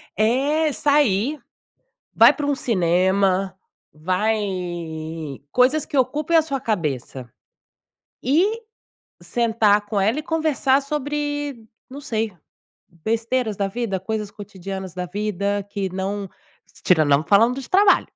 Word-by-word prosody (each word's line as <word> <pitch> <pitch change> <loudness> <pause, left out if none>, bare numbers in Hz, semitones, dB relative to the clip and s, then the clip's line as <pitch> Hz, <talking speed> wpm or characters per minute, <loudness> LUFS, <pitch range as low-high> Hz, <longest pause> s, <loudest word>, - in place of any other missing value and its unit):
É, 280 +8 +2
sair. 285 -2 +2 0.8
Vai - - +8
para 295 - -4
um 285 - +1
cinema, 190 -2 +1 0.3
vai 185 +8 0 1.1
coisas 260 +4 +3
que 285 - -3
ocupem 295 +6 +2
a - - +6
sua 275 -4 -3
cabeça. 140 - -3 0.9
E, 380 - +2 0.6
sentar 220 -3 +2
com 205 -1 -2
ela 220 +8 +1
e - - -3
conversar 300 -4 +1
sobre, 290 -3 -3 0.2
não 270 +2 -9
sei, 225 -6 -2 0.7
besteiras 225 -1 -1
da 200 -1 0
vida, 205 -2 -3
coisas 210 +1 -4
cotidianas 195 -2 -7
da 180 -1 -4
vida 200 +1 -2
que 200 -1 -3
não 195 +1 -3 0.5
tirando 155 -5 +3
não 140 +1 +4
falando 230 +8 +3
de 260 - -10
trabalho. 390 +1 +4
220 Hz, 120 wpm, -22 LUFS, 195-280 Hz, 1.1 s, Vai